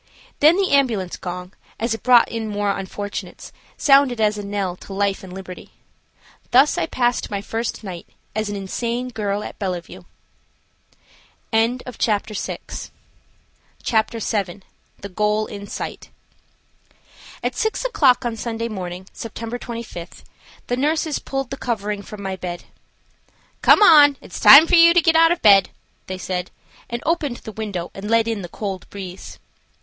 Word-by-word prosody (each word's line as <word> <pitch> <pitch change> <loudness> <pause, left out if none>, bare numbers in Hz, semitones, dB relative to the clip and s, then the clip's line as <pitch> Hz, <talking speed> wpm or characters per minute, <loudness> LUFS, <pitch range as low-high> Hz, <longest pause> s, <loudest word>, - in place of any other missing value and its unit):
Then 310 +3 +6
the 390 -1 +1
ambulance 230 -10 +1
gong, 180 +1 -7 0.3
as 230 0 0
it 225 - -6
brought 245 -2 +6
in 225 -1 -4
more 205 -1 0
unfortunates, 205 +1 -6 0.2
sounded 275 -4 +4
as 215 -1 +2
a 205 - -6
knell 200 -3 -3
to 195 - -10
life 200 0 -1
and 185 - -10
liberty. 185 -1 -9 0.8
Thus 270 +4 +5
I - - -1
passed 245 -1 0
my 200 - -2
first 225 +3 -4
night 180 -4 -8 0.3
as 215 -1 -1
an 205 - -4
insane 235 +5 -3
girl 210 -3 -2
at - - -9
Bellevue. 180 -4 -5 1.5
CHAPTER 225 -2 0
VII. - - -6 0.9
THE 205 -3 -3
GOAL 210 +2 +1
IN 200 -1 -8
SIGHT. - - -6 1.3
AT - - -2
6 440 +2 -1
o'clock 270 - +3
on 235 -1 -2
Sunday 230 0 -4
morning, 185 -3 -6
Sept. 230 +1 -6
25, 230 -9 -8 0.4
the 245 - -2
nurses 305 +2 0
pulled 270 -1 -4
the 275 - -4
covering 210 -5 -3
from 200 0 -10
my 190 -1 -3
bed. 175 -2 -6 1.0
"Come, 295 -8 +7
it's - - -9
time 285 +4 +10
for 345 - -4
you 335 0 +7
to 350 - +6
get 330 0 +3
out 330 +1 +6
of 345 - -1
bed," 200 -3 +6 0.4
they 185 - -4
said, 185 0 -4 0.4
and 235 0 -4
opened 300 -7 0
the 220 - -9
window 200 -5 -5
and 200 +2 -7
let 230 0 +3
in 225 -3 -2
the 175 - -7
cold 195 -2 -6
breeze. 190 -2 -9
220 Hz, 150 wpm, -21 LUFS, 195-250 Hz, 1.5 s, time